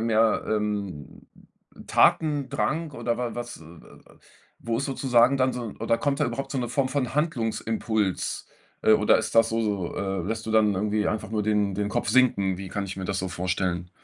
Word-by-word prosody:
mehr, 115 -1 +2
ähm, 105 -8 -3 0.6
Tatendrang 150 +1 +2
oder 120 -1 -2
wa 120 -2 -3
was 120 0 -6
äh, 80 - -15
äh, - - -13 0.5
äh, - - -22 0.4
wo 115 0 -2
ist 140 - -1
sozusagen 130 -1 +3
dann 130 -1 +2
so 120 -4 -5
oder 115 - +2
kommt 140 -1 0
da 145 - +4
überhaupt 125 +3 -4
so 135 - -1
'ne 120 -2 -2
Form 130 +2 0
von 130 -1 -2
Handlungsimpuls? 115 - -1 0.4
Äh, 110 - +5
oder 105 0 +5
ist - - -3
das 115 - +5
so 115 0 0
so 100 -5 -2
äh, 95 -2 -2
lässt 110 +4 -3
du - - -3
dann 105 -2 +4
irgendwie 105 +2 0
einfach 110 -1 -3
nur 105 -2 0
den 105 -2 +1
den 105 +1 -1
Kopf - - -2
sinken? 100 -8 +3
Wie 95 - -6
kann 105 - -3
ich 95 -1 -6
mir 95 - -5
das 100 +1 -2
so 95 - -3
vorstellen? 90 -1 -2
110 Hz, 200 wpm, -26 LUFS, 100-125 Hz, 0.6 s, Äh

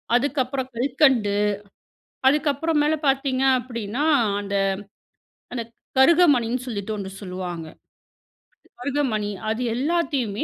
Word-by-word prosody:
அதுக்கப்புறம் 260 0 0
கல்கண்டு. 240 -5 +2 0.9
அதுக்கப்புறம் 300 +2 +2
மேல 300 +1 +2
பார்த்தீங்க 270 -1 +1
அப்பிடின்னா, 235 +1 -4 0.4
அந்த, 200 0 -4 1.0
அந்த 240 -2 -2 0.4
கருகமணின்னு 265 -6 +4
சொல்லிட்டு 215 -3 -4
1 195 -2 -5
சொல்லுவாங்க. 180 -3 -5 1.1
கருகமணி 250 -6 -1 0.2
அது 225 +3 -2
எல்லாத்தையுமே 270 -7 0
255 Hz, 85 wpm, -23 LUFS, 215-285 Hz, 1.1 s, கருகமணின்னு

